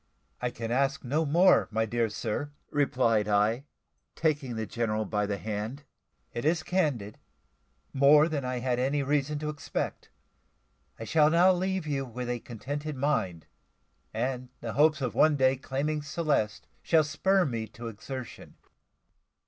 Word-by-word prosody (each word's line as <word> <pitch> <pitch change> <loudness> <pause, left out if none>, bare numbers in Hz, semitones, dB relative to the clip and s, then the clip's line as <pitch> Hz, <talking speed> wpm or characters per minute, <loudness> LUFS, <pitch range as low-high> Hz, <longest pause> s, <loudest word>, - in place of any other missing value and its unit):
"I 125 - 0
can 115 -1 -5
ask 140 +2 +1
no 150 +5 0
more, 175 +6 +5
my 110 0 0
dear 115 0 0
sir," 110 +6 -3 0.2
replied 125 -7 +2
I, 105 +6 +2 0.5
taking 145 -6 0
the 110 0 -2
general 110 0 -1
by 105 0 -1
the 100 -1 -2
hand: 110 +7 -4 0.5
"it 120 - -4
is 160 +2 +1
candid 140 - -1 0.7
more 145 +3 +6
than 150 -4 -2
I 125 0 -2
had 125 0 -1
any 140 +3 +1
reason 145 +1 0
to 150 +1 -3
expect. 150 -1 -4 0.9
I - - -7
shall 150 +5 +4
now 175 +3 +5
leave 185 -1 -1
you 140 -3 -1
with 125 -1 -5
a 120 - -2
contented 145 +7 -5
mind; 95 - -1 0.7
and 125 +2 -3
the 115 -2 -5
hopes 155 +1 +3
of 130 - -1
one 155 -1 +4
day 130 -1 +3
claiming 140 +3 -2
Celeste 145 -8 -1 0.2
shall 160 -2 +4
spur 185 +5 +2
me 115 -4 -3
to 115 +2 -9
exertion." 120 +3 -8
135 Hz, 150 wpm, -28 LUFS, 115-150 Hz, 0.9 s, more